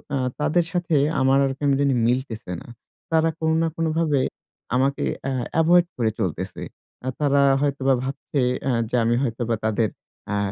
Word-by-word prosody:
আ - - +1 0.2
তাদের 165 +3 +2
সাথে 175 -2 0 0.3
আমার 135 +1 +4
আর 135 - 0
কেন 145 - +1
জানি 140 -1 +3
মিলতেছে 120 -5 -2
না। - - -13 0.4
তারা 160 0 +3
কোন 160 0 +1
না 165 - +2
কোনভাবে 160 -3 +1 0.6
আমাকে 135 +2 +1 0.2
অ্যা 135 - -2 0.3
এভয়েড 175 +2 +5
করে 115 -3 +1
চলতেছে। 95 -7 -3 0.4
অ্যা 130 - -3
তারা 140 -1 +3 0.2
হয়তোবা 140 -2 +1
ভাবছে 135 +1 -3 0.2
অ্যা 135 - 0 0.2
যে - - -1
আমি 120 +1 +2
হয়তোবা 115 -2 -1
তাদের 110 0 +1 0.4
অ্যা 105 - 0
135 Hz, 160 wpm, -23 LUFS, 120-155 Hz, 0.6 s, এভয়েড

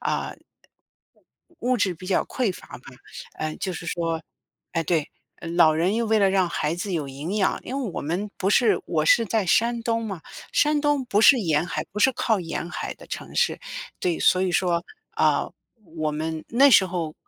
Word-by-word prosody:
啊， - - -1
呃， - - -9 1.2
物 255 +1 +1
质 190 -3 +1
比 185 +3 -11
较 190 - +2
匮 240 -8 -1
乏 - - -13
嘛， 125 - -17 0.6
呃， 155 0 -3
就 185 - -3
是 170 0 -7
说 165 -1 -2 0.5
哎， 165 -1 0
对， 160 -2 0 0.3
呃， 170 - -8
老 165 -2 +5
人 175 +6 +1
又 230 0 0
为 220 0 +2
了 195 -1 +4
让 190 -2 +1
孩 155 -1 -1
子 185 +2 -4
有 150 -5 -2
营 145 +9 -5
养 195 - +1
因 270 +2 -4
为 230 -7 -3
我 - - -3
们 180 +7 -3
不 195 - 0
是 225 +1 +4
我 155 -2 0
是 230 - +5
在 215 -2 0
山 230 +6 +2
东 230 -1 -1
嘛， 195 -6 -5 0.3
山 300 0 +2
东 290 -2 +2
不 210 -2 +2
是 270 - +8
沿 160 -4 +1
海 - - -3
不 210 - -6
是 265 +5 +4
靠 220 -4 0
沿 170 0 -4
海 - - -5
的 - - -15
城 - - -7
市， 485 - +1 0.4
对， 175 -2 0
所 185 0 +4
以 185 -2 0
说， 175 -2 +1 0.3
啊， - - +2 0.5
我 155 -1 0
们 160 +1 -4
那 270 +4 +5
时 190 -5 +6
候 170 -4 -4
185 Hz, 220 characters per minute, -24 LUFS, 165-225 Hz, 1.2 s, 是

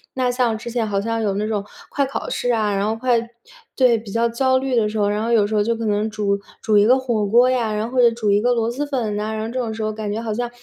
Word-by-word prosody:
那 250 -1 +1
像 245 -3 0
之 225 - -7
前 230 -2 -1
好 200 -1 -1
像 230 +1 -2
有 205 -3 0
那 210 +2 -1
种 210 -2 -2 0.3
快 280 -1 0
考 270 - -5
试 245 - -1
啊， 210 -2 0
然 195 +1 0
后 220 - 0
快 245 +1 +1 0.6
对， 250 -3 +4
比 210 -3 -10
较 230 +2 +1
焦 260 +3 +2
虑 265 -1 -1
的 215 -3 +2
时 220 - -5
候， 205 - +2
然 210 +1 -1
后 235 - -1
有 215 -3 +4
时 215 - -5
候 210 - +3
就 230 +2 0
可 230 0 -4
能 210 +1 0
煮 200 -2 -1 0.2
煮 215 - +2
一 205 - +5
个 250 +4 +5
火 235 -5 -1
锅 240 +4 +5
呀， 235 -4 0
然 215 +2 -2
后 255 - 0
就 235 - +7
煮 220 -3 -1
一 205 - +3
个 245 +2 +2
螺 230 0 0
蛳 285 +4 -3
粉 235 -7 -2
呐， 215 +1 -2
然 215 - -3
后 - - -4
这 255 - -2
种 230 -3 -2
时 220 0 -4
候 215 0 -2
感 210 -1 -4
觉 215 - -3
好 220 -2 -3
像， 240 +2 -2
225 Hz, 335 characters per minute, -21 LUFS, 210-245 Hz, 0.6 s, 就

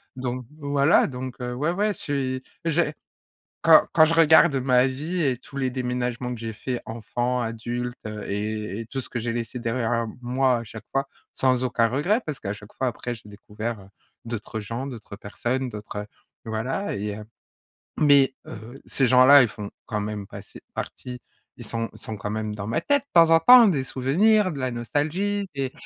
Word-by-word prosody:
donc 125 -1 -4
voilà, 145 +1 +3
donc, 130 -1 -6
heu, 125 0 -3
ouais, 145 +6 -1
ouais 205 +3 0
je - - -16
suis 130 -3 -2 0.2
j'ai 165 -1 +1 0.7
quand - - +7
quand 160 0 +7
je 165 - +1
regarde 160 -1 +6
ma 125 0 +3
vie 155 +7 -3
et 130 -2 +1
tous 135 +2 -14
les 130 -2 0
déménagements 125 -1 -2
que 120 - -6
j'ai 115 -1 -4
fait 125 +3 -4
enfant, 120 +2 -2
adulte, 120 +2 -4
heu, 105 0 -6
et 105 0 -3
et 115 - -7
tout 135 - -4
ce - - -7
que 120 - -3
j'ai 115 +1 -2
laissé 115 +1 -4
derrière 115 -1 -1 0.2
moi, 125 0 +2
à 115 - -6
chaque 110 0 -10
fois. 135 0 0 0.3
Sans 130 -1 +2
aucun 115 -2 +2
regret 150 - +1
parce 150 -3 -4
qu'à 100 - -3
chaque 105 0 -12
fois 130 - -1
après 120 0 -4
j'ai 110 - -16
découvert, 105 +2 -6
heu, 95 - -15 0.4
d'autres 110 -1 -5
gens, 115 +6 -5
d'autres 115 -6 -8
personnes, 125 +6 -3
d'autres, 105 -1 -7
heu, 105 - -7 0.4
voilà 115 - -2
et 105 0 -3
heu, 105 - -8 0.7
mais, 140 -3 +5
heu, 115 +5 -10
ces 135 - +1
gens-là 130 +2 +8
ils 120 - +2
font 105 -1 -7 0.2
quand 105 -2 -2
même 105 -1 -4
passer - - -11
partie, 125 -1 -6 0.4
ils 120 - -9
sont 115 +1 -2
sont 110 - -7
quand 105 +1 -5
même 110 0 -3
dans 100 -1 -6
ma 115 - 0
tête 285 0 +2
de - - -50
temps 165 -1 +5
en 165 - +7
temps, 240 +5 +9
des 140 -7 0
souvenirs, 185 +12 +2
de 145 - -6
la 130 - -1
nostalgie, 170 - -1
des 135 -1 -2
125 Hz, 195 wpm, -24 LUFS, 115-140 Hz, 0.7 s, temps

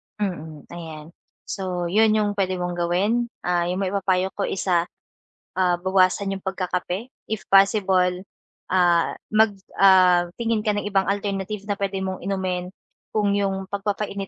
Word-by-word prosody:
Mm, 160 -7 -5
ayan 160 -2 -9 0.4
so 185 -2 -3
'yon 215 +5 +4
'yong 210 -1 +1
puwede 185 -2 -1
mong 180 0 -2
gawin, 190 +8 +1 0.2
ah 175 -1 +2
'yong 180 +1 -2
maipapayo 190 -1 +1
ko 200 - -2
is, 190 0 -3
ah, 175 -2 +3 1.0
bawasan 190 +1 +2
'yong 195 - -9
pagkakape 185 +2 -3 0.2
if 220 -1 -2
possible, 190 -2 +4 0.5
ah, 175 -2 +3 0.2
mag 215 0 +4 0.3
ah, 185 -2 +6
tingin 230 -1 +1
ka 210 - +2
ng 205 - -2
ibang 195 -1 +1
alternative 200 0 -2
na 205 - +1
puwede 195 -1 -1
mong 190 0 -3
inumin 185 -2 -2 0.5
kung 205 -2 +2
'yong 195 -1 0
pagpapainit 200 0 -3
190 Hz, 145 wpm, -23 LUFS, 180-200 Hz, 1.0 s, ah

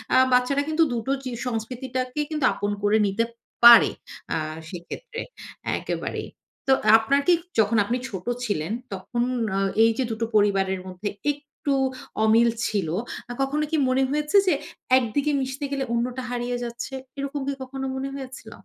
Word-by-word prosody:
আ - - +7 0.2
বাচ্চারা 250 +3 +3
কিন্তু 315 +1 +3
দুটো 235 +2 -2
চি 255 - -4 0.2
সংস্কৃতিটাকে 255 +3 -3
কিন্তু 300 -3 -2
আপন 205 0 -2
করে 205 +1 +4
নিতে 200 +4 +1 0.4
পারে 235 0 +10 0.4
আ - - +1 0.3
সেক্ষেত্রে 455 - -7 0.6
একেবারেই। - - -4 0.4
তো - - +4 0.3
আপনার 225 +6 +2
কি 355 - +7 0.3
যখন 220 +1 +3
আপনি 235 +5 -1
ছোট 190 -3 -6 0.2
ছিলেন 175 -4 -2 0.2
তখন 195 +6 -3 0.4
আ - - +2 0.2
এই 225 - +5
যে, 260 - +1
২ - - -1
টো - - +2
পরিবারের 195 -2 +3
মধ্যে 185 +3 -4 0.2
একটু 290 0 -4 0.5
অমিল 230 +2 +5 0.2
ছিল। 200 -6 -1 0.4
আ - - -3
কখনো 285 +3 0
কি 320 - +2
মনে 260 +1 +3
হয়েছে 300 +6 +2
যে, 360 - +5 0.4
১ 260 - +2
দিকে 290 +1 +2
মিশতে 265 +2 -3
গেলে 275 -1 -1
অন্যটা 245 +2 -1
হারিয়ে 245 0 -2
যাচ্ছে? 235 +2 -6 0.2
এরকম 280 +1 -3
কি 280 - 0
কখনো 265 +1 -5
মনে 270 +1 -3
হয়েছিল? 265 -1 -8
250 Hz, 160 wpm, -25 LUFS, 220-275 Hz, 0.6 s, পারে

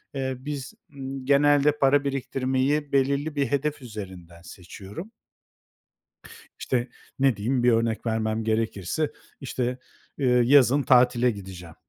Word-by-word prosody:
eee, 130 -1 -2
biz, 140 -1 -6 0.2
ımm, 135 -1 -6
genelde 145 +1 +4
para 140 +1 +4
biriktirmeyi 135 +1 -1
belirli 140 +3 +1
bir 140 -1 +1
hedef 145 +1 -1
üzerinden 95 -7 -9
seçiyorum 95 - -10 1.5
işte, 125 -1 -1 0.3
ne 135 -3 +3
diyeyim, 120 +4 -1
bir 125 - +5
örnek 115 0 0
vermem 110 -1 -1
gerekirse, 110 - -1 0.3
işte, 125 -2 -3 0.4
eee, 135 - 0 0.2
yazın 140 +2 +5
tatile 125 -1 +4
gideceğim. 90 -5 -10
130 Hz, 115 wpm, -25 LUFS, 110-140 Hz, 1.5 s, bir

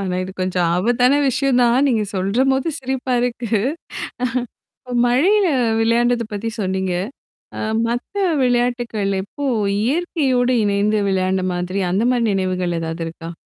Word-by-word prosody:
ஆனா, 185 -2 -2
இது 190 - -8
கொஞ்சம் 185 -1 0
ஆபத்தான 245 +8 +3
விஷயம் 265 0 +1
தான், 245 +3 +3
நீங்க 230 -5 +1
சொல்றபோது 255 - +1
சிரிப்பா 265 -1 -2
இருக்கு. 240 -2 -2 1.6
மழையில 370 +12 +3 0.3
விளையாண்டத 235 +1 +2
பத்தி 210 +2 -3
சொன்னீங்க. 190 -1 -1 0.7
அ - - -4 0.3
மத்த 240 +11 -4 0.3
விளையாட்டுகள் 240 -4 0
எப்போ, 280 +8 -6 0.4
இயற்கையோடு 265 -3 +1
இணைந்து 205 +1 +1
விளையாண்ட 185 0 0
மாதிரி 180 +2 -2
அந்த 195 +5 +1
மாதிரி 240 -2 +1
நினைவுகள் 185 -2 -1
எதாவது 165 +1 -4
இருக்கா? 165 0 -8
230 Hz, 120 wpm, -20 LUFS, 190-250 Hz, 1.6 s, ஆபத்தான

